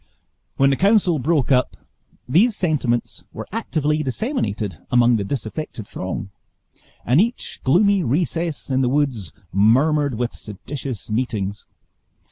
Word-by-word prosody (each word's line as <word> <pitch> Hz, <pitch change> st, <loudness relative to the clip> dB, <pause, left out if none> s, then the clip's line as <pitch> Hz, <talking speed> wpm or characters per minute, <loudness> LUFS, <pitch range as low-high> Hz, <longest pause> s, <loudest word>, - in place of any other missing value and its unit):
When 135 Hz, 0 st, +4 dB
the -, -, +2 dB
council 195 Hz, -5 st, +3 dB
broke 145 Hz, -1 st, +1 dB
up, 125 Hz, -1 st, +2 dB, 0.5 s
these 200 Hz, -, +4 dB
sentiments 140 Hz, -, -1 dB
were -, -, -7 dB
actively 150 Hz, -1 st, -1 dB
disseminated 130 Hz, -, -2 dB
among 120 Hz, -1 st, +4 dB
the 100 Hz, -, -2 dB
disaffected 110 Hz, 0 st, -5 dB
throng; 95 Hz, +1 st, -5 dB, 0.7 s
and 130 Hz, -, +4 dB
each 235 Hz, +3 st, -3 dB
gloomy 195 Hz, +7 st, +4 dB
recess 165 Hz, +2 st, -1 dB
in 130 Hz, 0 st, +2 dB
the 125 Hz, -, +2 dB
woods 130 Hz, -, 0 dB, 0.2 s
murmured 135 Hz, -, +3 dB
with 120 Hz, +1 st, -2 dB
seditious 120 Hz, +3 st, -7 dB
meetings. 105 Hz, -4 st, -2 dB
135 Hz, 120 wpm, -21 LUFS, 115-160 Hz, 0.7 s, When